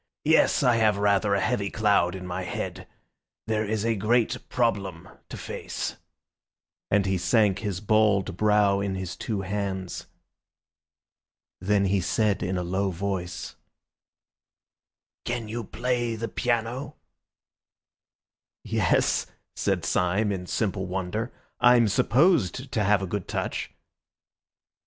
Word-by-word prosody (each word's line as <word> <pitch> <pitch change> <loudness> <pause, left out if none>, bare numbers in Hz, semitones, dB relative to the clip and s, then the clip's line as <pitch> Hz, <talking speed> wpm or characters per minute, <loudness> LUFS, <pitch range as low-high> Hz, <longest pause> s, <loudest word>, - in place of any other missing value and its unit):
Yes, 160 -1 +4
I 125 -3 +4
have 110 -3 +3
rather 100 0 +2
a - - +1
heavy 105 -3 0
cloud 100 -5 +2
in 90 -1 -7
my 90 +1 -4
head. 90 - -5 0.6
There 110 -1 0
is 110 0 -2
a 115 - +2
great 110 +3 0
problem 100 -8 -1 0.2
to - - -7
face," - - -5 0.9
and 100 -1 +3
he 95 -1 0
sank 100 +1 +3
his 100 -4 -3
bald 105 -4 +2
brow 105 -1 +3
in 100 -1 -2
his 95 -1 -5
two 105 -4 -3
hands. 95 -1 -4 1.5
Then 100 +1 +2
he 95 0 +2
said 105 +2 +1
in 90 +1 -1
a 90 - -1
low 95 +3 0
voice— 90 -1 -4 1.7
"Can 115 -2 -3
you 115 +2 -4
play 120 +2 -1
the 115 +1 -3
piano?" 120 +4 -2 1.7
"Yes," - - +1 0.3
said - - -1
Syme 95 +4 +1
in 90 -2 -4
simple 95 -3 -1
wonder, 95 +6 -3 0.3
"I'm 120 -2 +6
supposed 130 - +2
to 110 - 0
have 100 -1 +3
a - - 0
good 95 0 -4
touch." - - -3
105 Hz, 125 wpm, -26 LUFS, 95-115 Hz, 1.7 s, I'm